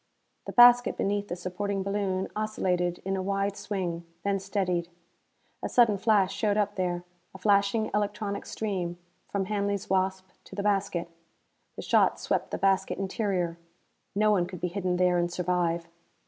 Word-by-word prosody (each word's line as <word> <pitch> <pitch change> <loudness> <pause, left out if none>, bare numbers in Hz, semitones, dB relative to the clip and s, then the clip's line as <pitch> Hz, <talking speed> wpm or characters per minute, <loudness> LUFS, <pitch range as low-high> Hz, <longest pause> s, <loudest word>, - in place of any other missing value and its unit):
The - - -3
basket 245 0 +7
beneath 205 +1 0
the 175 - -3
supporting 190 +2 -3
balloon 195 -1 -1
oscillated 180 -5 -1
in 195 0 0
a 190 - -1
wide 195 +1 -1
swing, 180 -5 -3 0.2
then 200 -1 +1
steadied. 185 -3 -1 0.7
A - - -3
sudden 225 -5 +4
flash 205 -3 +3
showed 210 -2 0
up 205 -1 +1
there 180 -2 -2 0.3
a - - -6
flashing 200 +2 +2
electronic 205 0 -2
stream, 185 -5 -3 0.3
from 200 -1 -1
Hanley's 200 -1 -2
Wasp 190 0 0 0.2
to - - -11
the 200 - -3
basket. 195 -4 0 0.7
The - - -7
shot - - +3
swept - - -1
the - - -3
basket 195 0 +1
interior. 190 -4 -1 0.6
No 215 +1 +4
one 180 -4 +2
could 180 -1 -8
be 180 - -1
hidden 180 -1 -1
there 180 -1 +3
and 175 0 0
survive. 170 -1 0
195 Hz, 160 wpm, -28 LUFS, 180-205 Hz, 0.7 s, basket